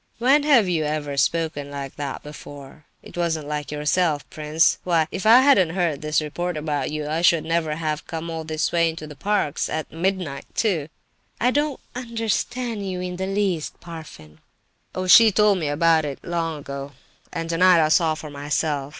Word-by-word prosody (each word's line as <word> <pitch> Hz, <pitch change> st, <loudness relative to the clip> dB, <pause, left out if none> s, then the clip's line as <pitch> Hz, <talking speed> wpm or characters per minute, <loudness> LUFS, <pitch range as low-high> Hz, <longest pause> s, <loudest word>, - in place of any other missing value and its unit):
"When 265 Hz, +5 st, +4 dB
have 275 Hz, -9 st, +4 dB
you 165 Hz, -3 st, 0 dB
ever 150 Hz, -1 st, -3 dB
spoken 145 Hz, 0 st, 0 dB
like 140 Hz, -1 st, -6 dB
that 140 Hz, -2 st, -5 dB
before? 145 Hz, 0 st, -11 dB, 0.2 s
It -, -, -13 dB
wasn't 165 Hz, -4 st, -1 dB
like 150 Hz, -1 st, -4 dB
yourself, 150 Hz, +1 st, 0 dB
prince. 155 Hz, +1 st, +2 dB
Why, 165 Hz, -3 st, +2 dB
if 195 Hz, +2 st, -3 dB
I 235 Hz, +3 st, +8 dB
hadn't 190 Hz, -, +4 dB
heard 170 Hz, -6 st, 0 dB
this 155 Hz, 0 st, 0 dB
report 175 Hz, +3 st, -3 dB
about 150 Hz, -1 st, -2 dB
you, 150 Hz, -1 st, -4 dB
I 160 Hz, +2 st, -1 dB
should 170 Hz, -2 st, +4 dB
never 165 Hz, -2 st, -1 dB
have 155 Hz, -1 st, -3 dB
come 165 Hz, 0 st, -5 dB
all 165 Hz, -1 st, -4 dB
this 155 Hz, 0 st, -2 dB
way 170 Hz, -1 st, +3 dB
into 160 Hz, -1 st, -7 dB
the 150 Hz, -1 st, -10 dB
park—at 155 Hz, -3 st, -1 dB
midnight, 170 Hz, -5 st, -2 dB
too!" 175 Hz, -10 st, 0 dB, 0.5 s
"I 250 Hz, +2 st, +3 dB
don't 290 Hz, 0 st, 0 dB
understand 230 Hz, -2 st, -3 dB
you 180 Hz, -1 st, -4 dB
in 180 Hz, 0 st, -4 dB
the 190 Hz, +1 st, -3 dB
least, 195 Hz, -5 st, -1 dB
Parfen." 150 Hz, -, -11 dB, 0.6 s
"Oh, 185 Hz, -, -2 dB
she 220 Hz, +4 st, +8 dB
told 205 Hz, -1 st, +3 dB
me 155 Hz, -, -2 dB
all 145 Hz, -, -1 dB
about 165 Hz, 0 st, +3 dB
it 145 Hz, -2 st, -4 dB
long 165 Hz, -2 st, -2 dB
ago, 140 Hz, 0 st, -7 dB, 0.4 s
and 165 Hz, -1 st, -4 dB
tonight 175 Hz, +1 st, +5 dB
I -, -, 0 dB
saw 160 Hz, 0 st, +3 dB
for 155 Hz, -1 st, -9 dB
myself. 145 Hz, 0 st, -2 dB
165 Hz, 185 wpm, -23 LUFS, 150-185 Hz, 0.6 s, I